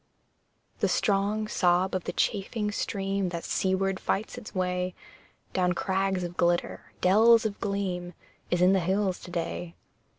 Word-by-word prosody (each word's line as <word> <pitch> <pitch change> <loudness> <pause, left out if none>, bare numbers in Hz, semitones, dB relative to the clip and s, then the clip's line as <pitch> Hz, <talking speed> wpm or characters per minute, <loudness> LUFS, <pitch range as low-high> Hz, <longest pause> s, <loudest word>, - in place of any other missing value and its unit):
The - - +2
strong 205 +1 +1
sob 180 -1 +2
of 185 -2 -2
the - - -2
chafing 210 +1 -1
stream 195 -2 -1
That 170 -1 -5
seaward 190 0 0
fights 210 +3 -2
its 240 -4 -10
way 180 0 -1 0.6
Down 180 -1 +2
crags 190 0 0
of 175 0 -6
glitter, 175 0 0
dells 220 +5 +6
of 205 -2 -2
gleam, 185 -3 -2 0.3
Is 175 0 +2
in 185 +1 +6
the 190 - +4
hills 190 +1 0
to - - -11
day. 170 0 -4
190 Hz, 145 wpm, -28 LUFS, 180-200 Hz, 0.6 s, dells